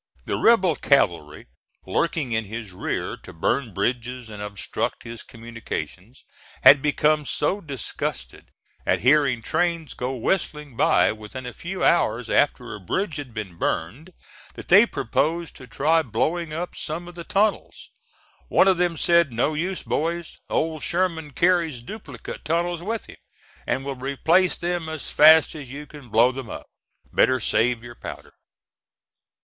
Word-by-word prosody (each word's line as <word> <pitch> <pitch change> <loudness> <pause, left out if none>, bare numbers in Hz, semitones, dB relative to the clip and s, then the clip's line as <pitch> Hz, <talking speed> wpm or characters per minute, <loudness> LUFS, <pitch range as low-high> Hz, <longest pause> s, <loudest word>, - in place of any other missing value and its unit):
The - - -1
rebel 190 -8 +4
cavalry 85 - +1 0.4
lurking 150 - -1
in 110 -1 0
his 110 0 -7
rear 90 - -3
to - - -13
burn 115 +9 0
bridges 120 +4 -3
and 105 -1 -8
obstruct 100 -3 -4
his 115 0 -8
communications 115 - -8 0.4
had 140 -1 +9
become 150 +1 +2
so 180 +7 -1
disgusted 140 - -5 0.4
at - - +1
hearing 130 -2 +3
trains 165 +1 -1
go 125 +2 -3
whistling 150 0 -2
by - - +4
within 110 +4 -8
a 125 - -6
few 185 +8 -5
hours 120 -8 +2
after 125 -5 +1
a 105 - -7
bridge 160 - -2
had 145 -4 -7
been 105 -6 -7
burned, 130 - -3 0.4
that - - -10
they 205 +6 +8
proposed 160 - -1
to 130 - -12
try 160 +7 +2
blowing 155 +7 -1
up 170 +3 -4
some 165 +3 -5
of 175 - -10
the 170 -1 -8
tunnels. 205 +4 -1 0.6
One - - +4
of 190 -2 +4
them 175 -2 +1
said, 170 -4 +3
"No 120 +6 0
use, 180 +5 -2
boys, 170 +1 -2
Old 160 -1 -1
Sherman 170 -4 -1
carries 170 -4 +2
duplicate 145 - -9
tunnels 170 +2 -1
with 220 +5 -3
him, - - -13 0.5
and 135 - -1
will 140 - -2
replace 160 +8 +2
them 175 -2 -2
as 160 -2 -5
fast 160 +1 +7
as 145 -5 -9
you 145 +2 -7
can 145 -4 -13
blow 115 +4 +5
them 130 -3 -7
up; - - -7 0.5
better 130 0 +3
save 115 +1 +1
your 120 0 -9
powder." - - -9
145 Hz, 155 wpm, -24 LUFS, 120-170 Hz, 0.6 s, had